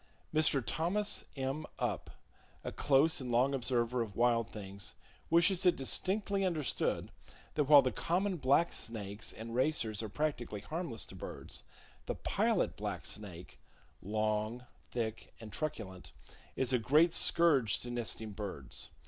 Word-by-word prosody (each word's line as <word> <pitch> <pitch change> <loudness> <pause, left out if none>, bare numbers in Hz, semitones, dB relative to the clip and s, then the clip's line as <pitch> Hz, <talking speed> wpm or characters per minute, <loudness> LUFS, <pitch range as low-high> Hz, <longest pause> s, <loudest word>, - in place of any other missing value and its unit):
—Mr. 155 -4 +3
Thomas 195 +6 +1
M. 135 +3 -2
Upp, - - -2 0.5
a - - -3
close 145 +2 +3
and 125 -2 -4
long 125 +4 +3
observer 125 -1 0
of 105 -4 -4
wild 115 -1 +3
things 100 -3 -7 0.3
wishes 170 +3 +4
it 180 -2 +5
distinctly 195 +8 0
understood 165 -7 0 0.4
that 150 - +2
while 145 -1 +9
the 130 - +1
common 180 - 0
black 145 +4 +3
snakes 105 -1 -5
and 115 +1 -7
racers 120 -5 +1
are 110 - -4
practically 120 -6 -2
harmless 150 - -4
to - - -12
birds, - - -7 0.5
the - - -1
Pilot - - +1
Black - - -4
Snake,—long, 105 +4 -4 0.2
thick 115 -2 -4
and 110 -3 -10
truculent,—is 115 - -5
a 125 - +4
great 155 +9 +4
scourge 140 -10 +4
to 120 - -6
nesting 115 -2 -2
birds. 95 - -6
125 Hz, 130 wpm, -34 LUFS, 110-155 Hz, 0.5 s, while